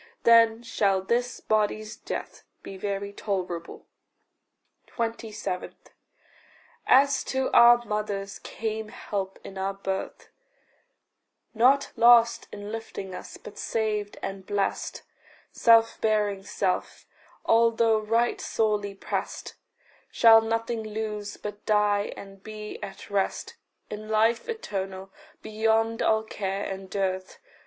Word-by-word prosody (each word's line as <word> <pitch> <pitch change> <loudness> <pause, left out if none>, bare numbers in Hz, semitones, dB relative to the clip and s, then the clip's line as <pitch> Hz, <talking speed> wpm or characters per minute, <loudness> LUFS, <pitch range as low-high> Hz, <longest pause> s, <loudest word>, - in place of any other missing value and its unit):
Then 230 0 +5
shall 195 -5 +1
this 245 +5 -1
body's 215 0 0
death - - -6 0.2
be 195 - -8
very 200 +1 -4
tolerable. 180 -5 -4 1.0
27. 225 -5 -4 1.1
As 275 +1 +5
to 265 0 -1
our 240 0 +7
mothers 205 -2 -3
came 220 -1 -4
help 195 -2 -5
in 190 -1 -8
our 195 +1 -2
birth 195 -1 -5 1.2
Not 255 +5 +4
lost 235 0 +5
in 205 0 -7
lifing 220 -4 -6
us, - - -8
but - - -11
saved 210 -2 -2
and 195 0 -5
blest 200 +1 -2 0.5
Self 230 -1 +4
bearing 210 -3 +1
self, 195 -1 -2 0.4
although 230 -1 +4
right 230 +3 +1
sorely 210 -2 0
prest, - - -4 0.6
Shall 225 -1 +7
nothing 230 +1 -2
lose, 215 -1 -5
but 205 0 -7
die 210 -1 +2
and 195 -1 -11
be 215 0 -8
at 205 0 -9
rest 195 -1 -1 0.4
In 215 +1 -7
life 225 - +2
eternal, 195 - -5 0.3
beyond 225 +1 +1
all 220 0 +2
care 200 -2 -3
and 190 0 -6
dearth. 190 -1 -2
215 Hz, 110 wpm, -26 LUFS, 195-225 Hz, 1.2 s, our